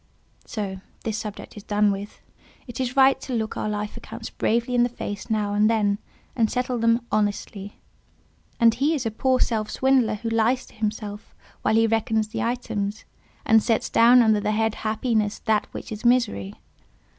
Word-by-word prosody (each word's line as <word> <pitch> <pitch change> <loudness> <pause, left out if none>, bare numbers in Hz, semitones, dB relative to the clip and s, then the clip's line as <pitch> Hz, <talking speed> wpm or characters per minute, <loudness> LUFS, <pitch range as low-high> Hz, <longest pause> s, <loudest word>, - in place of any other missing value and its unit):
So 195 -4 -4 0.2
this 220 -1 -2
subject 210 -2 -7
is 210 - -8
done 205 0 +2
with. 200 +1 -7 0.4
It 245 -1 -8
is 255 0 -2
right 270 0 +5
to 255 - -4
look 220 -1 -2
our 215 - -2
life 210 0 -3
accounts - - -8
bravely 235 +2 0
in 245 - +3
the 245 - +3
face 205 -2 -6
now 210 -2 0
and 210 +1 +3
then, 205 -3 +1 0.4
and 225 -4 +2
settle 250 -1 -1
them 230 +1 +2
honestly. 205 -1 -2 0.8
And 230 -1 +6
he 285 +7 +1
is 265 -5 -3
a 225 - 0
poor 255 +4 +1
self 215 -2 0
swindler 265 -4 +2
who 230 +2 -4
lies 225 +3 +1
to - - -19
himself 210 -1 -5 0.3
while 220 - +2
he 225 0 +5
reckons 220 -1 0
the - - -4
items, 215 -4 -3 0.4
and 225 0 +5
sets 225 0 0
down 240 +1 +6
under 220 -2 +3
the 210 +1 -1
head—happiness 220 0 0
that 215 -2 +2
which - - -8
is 215 +1 -6
misery. 235 - +1
220 Hz, 180 wpm, -24 LUFS, 210-240 Hz, 0.8 s, And